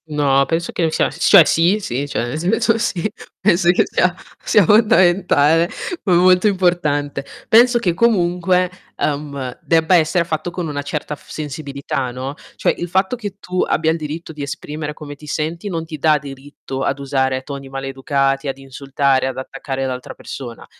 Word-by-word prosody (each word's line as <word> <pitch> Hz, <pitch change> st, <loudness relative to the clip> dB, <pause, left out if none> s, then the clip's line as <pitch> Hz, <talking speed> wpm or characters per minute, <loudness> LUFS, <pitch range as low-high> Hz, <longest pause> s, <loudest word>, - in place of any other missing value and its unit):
No, 140 Hz, -3 st, +2 dB
penso 165 Hz, +2 st, -2 dB
che 170 Hz, -, 0 dB
c'è -, -, 0 dB
s 160 Hz, +3 st, -12 dB
cioè 190 Hz, -6 st, +9 dB
sì, 175 Hz, +7 st, +3 dB
sì, 140 Hz, -, -3 dB
cioè 120 Hz, -, -2 dB
nel 140 Hz, +6 st, -4 dB
senso 225 Hz, +6 st, +2 dB
sì, 205 Hz, -5 st, -1 dB, 0.3 s
penso 175 Hz, -3 st, +3 dB
che 180 Hz, -, +4 dB
sia 185 Hz, 0 st, +1 dB, 0.3 s
sia 210 Hz, -, +4 dB
fondamentale, 175 Hz, -6 st, +4 dB, 0.4 s
ma 185 Hz, -4 st, +3 dB
molto 180 Hz, +3 st, +5 dB
importante. 155 Hz, -8 st, 0 dB, 0.2 s
Penso 240 Hz, +2 st, +6 dB
che 190 Hz, -8 st, 0 dB
comunque, 180 Hz, -3 st, +2 dB, 0.2 s
ehm, 140 Hz, -3 st, -3 dB
debba 165 Hz, +2 st, +3 dB
essere 170 Hz, +1 st, +3 dB
fatto 160 Hz, +1 st, -3 dB
con 175 Hz, -1 st, -4 dB
una 145 Hz, -1 st, -3 dB
certa 150 Hz, +1 st, -4 dB
f -, -, -22 dB
sensibilità, 140 Hz, -3 st, -4 dB
no. 130 Hz, +3 st, -5 dB, 0.2 s
Cioè -, -, +1 dB
il 175 Hz, -, -4 dB
fatto 190 Hz, +6 st, +1 dB
che 205 Hz, -4 st, -7 dB
tu 185 Hz, -2 st, -2 dB
abbia 160 Hz, 0 st, +1 dB
il 165 Hz, -, -1 dB
diritto 160 Hz, +1 st, -6 dB
di 150 Hz, -, -8 dB
esprimere 150 Hz, +2 st, -5 dB
come 150 Hz, -2 st, -9 dB
ti 150 Hz, +1 st, -14 dB
senti 165 Hz, +6 st, -3 dB
non 165 Hz, -3 st, -3 dB
ti 160 Hz, -1 st, -7 dB
dà 155 Hz, +1 st, +4 dB
diritto 135 Hz, -1 st, -8 dB
ad 135 Hz, 0 st, 0 dB
usare 130 Hz, -1 st, -1 dB
toni 140 Hz, 0 st, -7 dB
maleducati, 135 Hz, +1 st, -1 dB
ad 135 Hz, -, -3 dB
insultare, 135 Hz, 0 st, 0 dB
ad 130 Hz, -, -5 dB
attaccare 135 Hz, 0 st, -4 dB
l'altra 130 Hz, -1 st, -5 dB
persona. 120 Hz, -4 st, -8 dB
155 Hz, 175 wpm, -19 LUFS, 140-180 Hz, 0.4 s, cioè